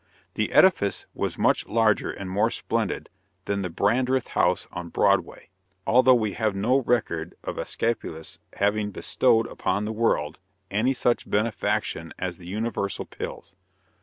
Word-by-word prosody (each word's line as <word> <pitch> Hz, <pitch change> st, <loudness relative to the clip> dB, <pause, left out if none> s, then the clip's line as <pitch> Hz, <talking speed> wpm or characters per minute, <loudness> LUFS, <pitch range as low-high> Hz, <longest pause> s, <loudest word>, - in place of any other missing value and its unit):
The -, -, -1 dB
edifice 165 Hz, -, +4 dB
was -, -, -3 dB
much -, -, +2 dB
larger 110 Hz, -1 st, +2 dB
and 100 Hz, -, -6 dB
more 95 Hz, +3 st, +2 dB
splendid -, -, -2 dB, 0.4 s
than 100 Hz, 0 st, -1 dB
the 90 Hz, -, -2 dB
Brandreth 125 Hz, +8 st, +1 dB
House -, -, +1 dB
on 90 Hz, -1 st, -6 dB
Broadway, -, -, +1 dB, 0.4 s
although 130 Hz, +1 st, +6 dB
we 110 Hz, -4 st, 0 dB
have 110 Hz, -2 st, 0 dB
no 115 Hz, +7 st, +2 dB
record 110 Hz, -10 st, -1 dB
of -, -, -5 dB
Æsculapius 80 Hz, -9 st, -3 dB
having 105 Hz, +1 st, +1 dB
bestowed 115 Hz, +3 st, +2 dB
upon 100 Hz, -2 st, -2 dB
the 110 Hz, -, -3 dB
world 80 Hz, -9 st, 0 dB, 0.3 s
any 115 Hz, +7 st, +2 dB
such 120 Hz, -1 st, 0 dB
benefaction 105 Hz, -5 st, -1 dB
as 90 Hz, -2 st, -4 dB
the 85 Hz, -, -11 dB
universal 105 Hz, 0 st, -2 dB
pills. -, -, -8 dB
105 Hz, 140 wpm, -25 LUFS, 95-115 Hz, 0.4 s, although